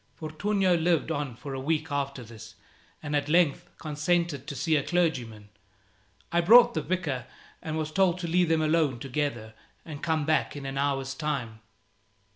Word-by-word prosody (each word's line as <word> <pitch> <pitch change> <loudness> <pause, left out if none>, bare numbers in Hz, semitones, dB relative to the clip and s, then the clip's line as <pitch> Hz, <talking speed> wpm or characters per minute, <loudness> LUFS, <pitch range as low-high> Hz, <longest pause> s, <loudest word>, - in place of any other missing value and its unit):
Fortunio 185 +4 0
lived 165 -1 +1
on 145 -6 -3
for 140 +4 -8
a 135 - -4
week 155 +2 -1
after 140 -2 -2
this, 110 -1 -12 0.5
and 150 -1 -2
at 145 0 0
length 175 +1 +2
consented 155 -1 -1
to 145 - -5
see 150 +4 +1
a 145 - +3
clergyman. 125 -12 -1 0.8
I 170 - +3
brought 240 +6 +7
the - - -1
vicar, 150 -10 -3 0.3
and 155 0 -4
was 155 -1 -3
told 185 0 +2
to 170 - -3
leave 175 0 +2
them 160 -1 +2
alone 155 -5 +2
together 125 -4 -3 0.3
and 150 -3 -8
come 160 -3 0
back 155 -1 +1
in 140 -1 -7
an 135 0 -3
hour's 135 -1 -1
time. 135 -7 -3
150 Hz, 170 wpm, -27 LUFS, 135-170 Hz, 0.8 s, brought